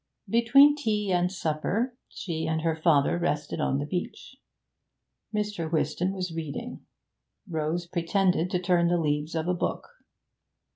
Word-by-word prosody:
Between 275 +6 +6
tea 210 -8 -1
and 180 0 +2
supper 195 +8 -1
she 160 -3 -4
and 160 0 -1
her 165 -1 +1
father 160 0 +3
rested 150 -4 -2
on 135 - +1
the 145 - -2
beach. 180 - -5 1.0
Mr. 210 -6 -2
Whiston 175 +3 0
was 185 -3 -4
reading. 165 - -6 0.6
Rose 160 0 -2
pretended 180 +1 +1
to 180 - 0
turn 175 -1 +2
the 175 0 +2
leaves 150 0 -1
of 160 +1 -1
a 180 - +2
book. 175 - -3
175 Hz, 140 wpm, -27 LUFS, 160-195 Hz, 1.0 s, Between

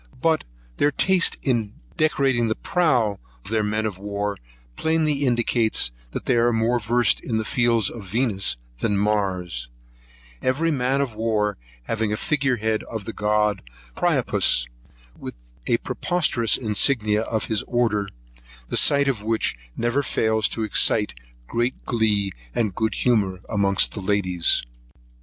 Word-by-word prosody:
But 160 +3 +1 0.3
their 145 - +3
taste 185 +4 +3
in 115 -6 0 0.2
decorating 135 -6 +2
the 110 - 0
prow 125 - +1 0.3
of - - -9
their 110 -1 +2
men 105 +1 -1
of 100 -4 -4
war, 100 0 -3 0.4
plainly 155 -3 +1
indicates 120 - +1 0.2
they 125 - 0
are 120 +1 +3
more 115 +2 +1
versed 115 +1 +2
in 115 -4 -2
the 110 - -2
fields 115 -3 +2
of 110 -5 -9
Venus 105 - +1 0.2
than 100 - 0
Mars, 100 - -1 0.7
every 155 +6 +1
man 135 -1 +1
of 135 -5 -2
war 105 -2 0 0.3
having 110 - -1
a 105 - -1
figure 135 -2 +1
head 110 0 0
of 110 -3 -6
the 115 - -5
god 105 0 +1 0.3
Priapus, - - +2 0.5
with - - -7 0.3
a 115 - +3
preposterous 130 -2 0
insignia 110 -1 +2
of 110 -1 -2
his 110 -2 -1
order; 110 -5 0 0.6
the - - -1
sight 140 -1 +4
of 125 -6 0
which 110 - 0 0.2
never 120 +4 +1
fails 110 -5 +1
to 115 - -3
excite 105 0 +2 0.3
great 120 - -2
glee 105 -4 +1 0.2
and 110 -5 0
good 110 +4 -1
humour 100 -7 +1
amongst 100 -2 +2
the 105 - -5
ladies. 95 -3 +2
110 Hz, 145 wpm, -23 LUFS, 105-125 Hz, 0.7 s, sight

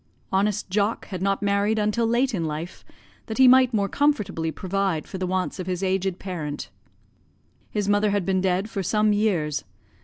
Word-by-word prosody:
Honest 200 +2 +1
Jock 205 +3 0
had 185 -3 -5
not 195 +1 0
married 200 +2 +1
until 215 +2 +1
late 245 +3 +1
in 170 -5 -1
life, 155 +3 -5 0.4
that 220 - -5
he 260 -1 +7
might 255 0 +6
more 205 -4 +1
comfortably 210 - 0
provide 190 -3 -1
for 190 - -7
the 185 - -1
wants 185 +1 -2
of 185 - -5
his 180 0 -2
aged 190 -1 0
parent. 160 -7 -5 1.0
His 205 -2 -2
mother 205 +1 +3
had 200 -3 0
been 190 -1 +1
dead 190 +2 +1
for 205 -3 -4
some 210 +3 +2
years. 185 -8 0
195 Hz, 180 wpm, -24 LUFS, 185-210 Hz, 1.0 s, he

